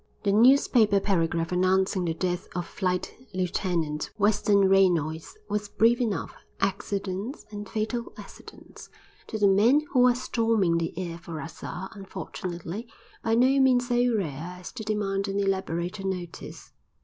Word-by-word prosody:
The 200 - +2
newspaper 225 -2 +5
paragraph 165 -4 0
announcing 185 0 +2
the 165 -1 -1
death 180 0 -2
of 175 -1 -2
Flight 180 -1 -2 0.2
Lieutenant 170 -4 -1
Western 205 -1 +3
Reynolds 175 - +2
was 210 0 -2
brief 235 +4 +3
enough; 220 -5 -2 0.3
accidents, 195 +4 -3
and 205 -1 -7
fatal 225 +2 -3
accidents, - - -13 0.4
to 220 - -4
the 205 -1 +4
men 220 +9 +5
who 250 -2 +5
are 245 - +4
storming 225 -8 +1
the 165 0 -4
air 170 -2 -4
for 165 -1 -7
us 160 +2 -9
are, 180 +4 -6
unfortunately, 195 0 -6 0.4
by 225 0 +2
no 260 +3 +4
means 250 -2 +3
so 245 -1 +2
rare 165 -1 -4
as 180 - -9
to 235 - -7
demand 200 -2 -1
an 195 0 -1
elaborated 190 0 -2
notice. 180 -3 -6
195 Hz, 145 wpm, -27 LUFS, 175-220 Hz, 0.4 s, newspaper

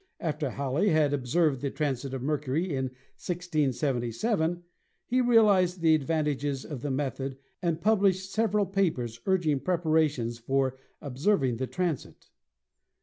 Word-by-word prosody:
After 150 -3 -2
Halley 140 +9 0
had 155 -4 +3
observed 140 +1 +1
the 140 - -1
transits 135 -2 -2
of 130 - -5
Mercury 150 +4 -1
in 130 0 -1 0.3
1677 160 - -1 0.4
he 255 +1 +1
realized 205 -7 +4
the 160 -1 +5
advantages 145 -3 0
of 145 -6 -6
the 145 - -3
method 135 -1 -3 0.2
and 170 -3 0
published 195 -1 +2
sev 220 +2 +1
eral 200 -2 +1
papers 125 - 0
urging 170 -7 +2
preparations 155 -9 +1
for 135 +2 0 0.3
observing 135 - +1
the 130 +2 -2
transit. 175 -4 -4
150 Hz, 130 wpm, -28 LUFS, 135-180 Hz, 0.4 s, the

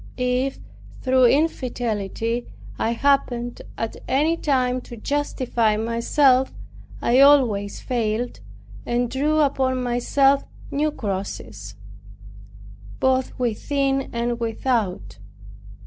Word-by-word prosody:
If 250 +1 0 0.5
through 260 -1 +4
infidelity 240 - 0 0.3
I 230 - +1
happened 245 -2 0 0.2
at 225 - -4
any 300 +5 +2
time 255 -5 0
to 240 - -11
justify 240 -4 0
myself, 250 +4 +2 0.5
I 245 +2 +4
always 245 -8 +4
failed, 235 - -2 0.4
and 240 0 -1
drew 300 +4 +1
upon 260 -3 +1
myself 270 +3 +2 0.3
new 300 +2 +1
crosses, 185 - -5 1.2
both 260 0 +1
within 270 +3 -1
and 235 0 -2
without. 220 - -2
250 Hz, 90 wpm, -23 LUFS, 230-270 Hz, 1.2 s, through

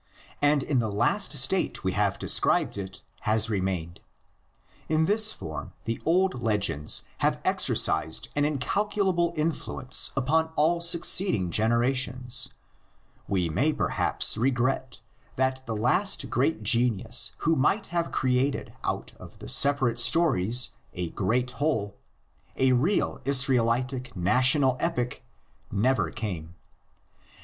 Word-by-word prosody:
And 145 -1 +2
in 135 -4 0
the 110 -2 -1
last 100 - +1
state - - +1
we - - 0
have - - 0
described - - +2
it 95 -2 -8 0.2
has 110 +1 +1
remained. 95 -4 -3 0.9
In 160 0 +2
this 215 +3 +3
form 80 - -8
the 115 0 -4
old 180 -4 +1
legends 105 -10 0 0.2
have - - 0
exercised 80 0 +1
an 145 - +1
incalculable 175 +4 0
influence 150 -4 0
upon 160 +5 +1
all 170 +3 +1
succeeding 170 - +2
generations. 125 +3 +1 0.8
We 90 -3 0
may 135 - 0
perhaps - - +1
regret 130 0 -1 0.3
that 130 0 -1
the 115 - -3
last 155 - +1
great 135 -2 0
genius 115 0 +2
who 165 +1 +3
might 175 +10 +1
have 170 -1 -1
created 130 +1 -1
out - - -4
of - - -13
the - - -10
separate 135 -4 +3
stories 120 - +2 0.2
a 90 -2 -4
great 120 +6 -1
whole, 115 -6 -2 0.6
a 130 0 +3
real 140 +6 0
"Israelitic 130 -2 0
national 130 - +3
epic," 125 -8 -3 0.5
never 105 -3 +1
came. 85 -4 -6
125 Hz, 120 wpm, -26 LUFS, 110-150 Hz, 0.9 s, this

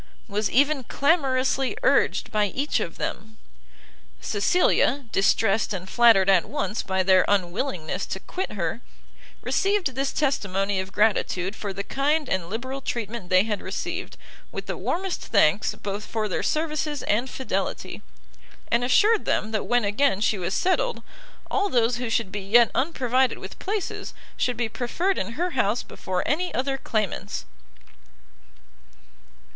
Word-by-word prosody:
was 210 -1 -1
even 280 +1 +3
clamorously 270 -2 +1
urged - - +2
by 210 -2 +2
each 280 +9 -1
of - - -4
them. 220 0 -5 0.8
Cecilia, 280 - +2
distressed 200 +1 +2
and 185 0 -6
flattered 225 -3 +5
at 190 -3 +4
once 280 -6 -2
by 190 -1 0
their 185 0 +5
unwillingness 185 - -1
to 190 - -4
quit 370 - -5
her, 195 +3 -2 0.6
received 390 -8 +1
this 270 +2 -1
testimony 200 -9 0
of 190 0 -4
gratitude 200 -2 +1
for 205 -2 -5
the 195 +1 -4
kind 290 +4 0
and 180 -6 -2
liberal 260 +6 -4
treatment 230 -6 -4
they 185 +1 +5
had 210 -2 -3
received, - - -5 0.3
with - - -6
the - - -3
warmest 370 +2 -2
thanks 200 -1 +2
both 205 +1 -5
for 220 -1 -2
their 190 - -2
services 305 -2 -1
and 235 +5 0
fidelity, 265 - -3 0.7
and 235 +1 +3
assured 420 - +4
them 215 - 0
that 215 - -2
when 245 -2 +2
again 205 +1 +2
she 210 -1 +1
was 185 +1 -2
settled, 475 +7 0 0.5
all 405 0 +1
those 240 -4 +2
who 245 -1 -3
should 225 -4 0
be 205 - -4
yet 225 +5 +5
unprovided 260 -3 +1
with - - -10
places, 410 -1 -4 0.2
should 250 -2 -1
be 240 -1 0
preferred 330 - -1
in 230 - -3
her 350 +7 -1
house 235 -4 +1
before 185 -1 -4
any 355 +5 0
other 270 +2 0
claimants. 215 -8 -2
230 Hz, 145 wpm, -25 LUFS, 200-275 Hz, 0.8 s, flattered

